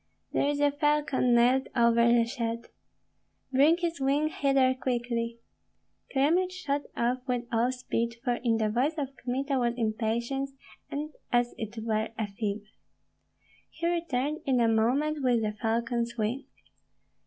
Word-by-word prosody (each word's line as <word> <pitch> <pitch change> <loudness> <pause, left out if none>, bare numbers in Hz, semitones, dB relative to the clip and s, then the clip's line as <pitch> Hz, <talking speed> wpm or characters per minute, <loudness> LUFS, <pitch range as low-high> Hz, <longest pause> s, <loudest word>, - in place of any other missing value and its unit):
"There 280 - +2
is 290 0 -1
a 290 0 +4
falcon 295 -4 +2
nailed 250 +3 +4
over 235 -1 +4
the 235 -1 +4
shed." 230 -1 -4 0.8
"Bring 295 +6 +5
his 340 -4 -3
wing 285 +3 +2
hither 275 -3 +2
quickly!" 240 -2 -2 0.7
Kyemlich 330 +7 +2
shot 290 -6 -2 0.2
off 245 +2 +1
with 245 -1 -1
all 235 +2 +2
speed, 235 -2 -2
for 245 -3 +1
in 230 -2 +2
the 215 -1 +1
voice 265 +8 +1
of 275 -2 -3
Kmita 265 +2 -1
was 240 -1 +1
impatience, 235 +4 -1 0.4
and 300 +2 -4 0.2
as 240 0 +2
it 220 +1 -6
were 220 -1 0
a 220 - 0
fever. 205 0 -4 1.0
He 335 - -6
returned 310 -4 -1
in 260 -2 +3
a 230 - +4
moment 265 +7 +1
with 245 -3 +2
the 210 - 0
falcon's 235 +2 -1
wing. 230 +5 -1
250 Hz, 145 wpm, -28 LUFS, 235-280 Hz, 1.0 s, Bring